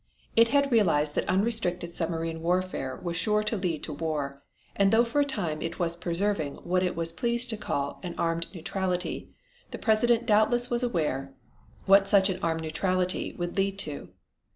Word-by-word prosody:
It 230 0 +6
had 280 +2 +2
realized 160 -10 +3
that - - -1
unrestricted 185 -4 0
submarine 165 -1 -2
warfare 175 -6 -1
was 170 -1 -3
sure 210 +3 +1
to 210 +2 0
lead 180 -6 -2
to 155 - -4
war, 145 -3 -3 0.3
and 195 -1 +3
though 225 +1 +5
for 265 +5 +1
a - - +5
time 175 - -3
it 165 +1 -4
was 170 -1 -1
preserving 170 -3 -1
what 180 +1 +1
it 180 -1 0
was 165 0 -1
pleased 235 +5 0
to 220 - -3
call 140 -8 -3
"an 180 -2 -6
armed 165 0 0
neutrality" 180 0 -3 0.4
the - - -6
President 235 +1 +2
doubtless 240 +3 +3
was 240 0 +1
well 245 - +1
aware 140 - -2 0.5
what 195 0 +5
such 195 -1 +5
an 185 - -4
"armed 165 -1 0
neutrality" 185 +3 -1
would 175 +1 -4
lead 195 0 +1
to. 150 -7 -3
180 Hz, 180 wpm, -28 LUFS, 165-210 Hz, 0.5 s, It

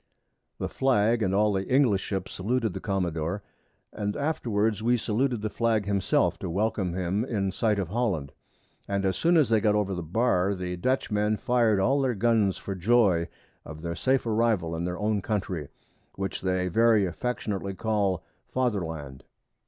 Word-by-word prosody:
The - - -2
Flag 120 -3 +2
and 95 -3 +1
all 105 +1 +3
the 95 0 -2
English 125 -8 +4
Ships 95 -2 -4
saluted 110 +1 -1
the - - -5
Commadore, 90 -1 -2 0.5
and 105 0 -3
afterwards 110 -8 0
we 120 +2 +3
saluted 115 +1 -1
the 110 - -1
Flag 115 -3 +1
himself 100 -2 +1
to - - -4
welcome 95 -1 -1
him 95 +3 -1
in 100 -6 -1
sight 105 +2 +1
of 95 -4 -2
Holland; 95 - -1 0.6
and 100 0 -1
as 95 - +1
soon 170 +1 +3
as 150 -7 +4
they 110 -2 +3
got 105 -1 +3
over 100 -2 0
the 90 - -3
Bar, 95 +2 +1
the 90 -1 -4
Dutch 130 +9 -1
men 105 +1 +1
fir'd 115 -4 +2
all 135 +8 +2
their 130 -3 0
Guns 105 -2 +2
for 100 - -5
joy 95 -3 +3 0.4
of 80 0 -10
their 85 0 -2
safe 130 +6 +1
Arrival 110 -7 +1
in 85 +1 -3
their 90 0 -3
own 105 0 0
Country, 95 -7 -3 0.5
which 95 -1 -4
they 95 -1 0
very 110 +2 +4
affectionately 100 0 -3
call 100 -4 0 0.2
Father 120 -7 0
land. 75 -5 -7
105 Hz, 175 wpm, -27 LUFS, 95-115 Hz, 0.6 s, English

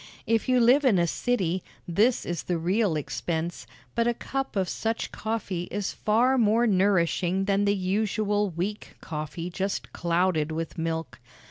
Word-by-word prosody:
If 230 +2 +1
you 255 -1 +4
live 250 +5 +5
in 245 -8 +4
a 170 - +3
city, 185 -2 0 0.3
this 215 +8 +2
is 175 -2 -2
the 175 - -1
real 185 +2 +1
expense; 165 +3 -3 0.3
but 235 0 +1
a 240 - +1
cup 270 0 -4
of 190 -2 +1
such 225 +4 -2
coffee 205 -5 -3
is 200 +1 -3
far 245 +5 +2
more 225 +1 +4
nourishing 190 -2 +2
than 200 0 +2
the 200 0 +3
usual 205 +2 0
weak 185 +5 -4
coffee 160 +3 -5
just 195 +3 -3
clouded 170 -2 +1
with 165 0 -4
milk. 160 -5 -3
195 Hz, 155 wpm, -27 LUFS, 170-220 Hz, 0.3 s, live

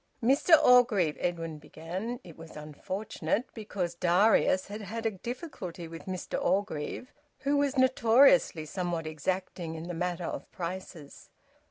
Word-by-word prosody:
"Mr 280 +7 +6
Orgreave 235 - +5
" - - -17
Edwin 165 -3 -3
began. 185 +11 -6
It 170 -3 -12
was 165 0 -12
unfortunate, 190 - -3
because 200 -6 -4
Darius 185 +2 +3
had 210 +2 -7
had 225 +3 -6
a 225 - +2
difficulty 190 - -7
with 165 +2 -10
Mr 185 -1 -3
Orgreave, 195 +4 -2 0.3
who 285 +1 +1
was 285 -1 +1
notoriously 255 - +5
somewhat 175 0 -3
exacting 165 +1 -3
in 160 - -6
the 175 +1 -5
matter 175 0 -2
of - - -6
prices. 170 -4 -7
185 Hz, 140 wpm, -29 LUFS, 165-225 Hz, 0.3 s, Mr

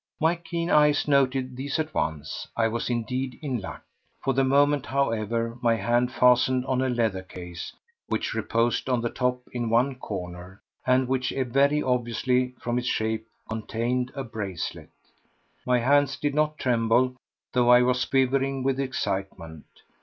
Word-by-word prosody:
My 160 +2 +3
keen 170 0 -3
eyes 150 -1 +4
noted 135 -2 +2
these 140 +2 -2
at 155 -1 -2
once. 75 0 -3
I 115 -1 +3
was 115 +2 -2
indeed 125 +2 -2
in 130 -6 -2
luck! 95 - -8 0.4
For 135 - +1
the 135 +1 +2
moment, 140 +1 +3
however, 115 -3 -1
my 115 -1 +3
hand 120 +3 +1
fastened 125 +1 +3
on 130 -1 0
a 130 - +1
leather 115 -6 0
case 90 -2 -8 0.4
which - - -2
reposed 115 +3 0
on 125 -2 +1
the 120 - -2
top 125 0 -1
in 120 -2 -2
one 120 +4 +3
corner, 90 -5 -7 0.3
and 130 0 +3
which 130 -1 0 0.2
very 140 +4 +3
obviously, 125 +1 0
from 120 +1 -1
its 125 - -4
shape, 110 -1 -1 0.2
contained 120 +3 -2
a 135 - -3
bracelet. 100 -7 -5 0.8
My 125 0 +4
hands 140 +3 +3
did 145 -1 -1
not 150 +1 +1
tremble, 125 +1 +2 0.4
though 125 -1 +3
I 125 0 +7
was 125 0 +2
quivering 135 0 +1
with 135 0 0
excitement. 95 - -3
125 Hz, 155 wpm, -26 LUFS, 115-135 Hz, 0.8 s, I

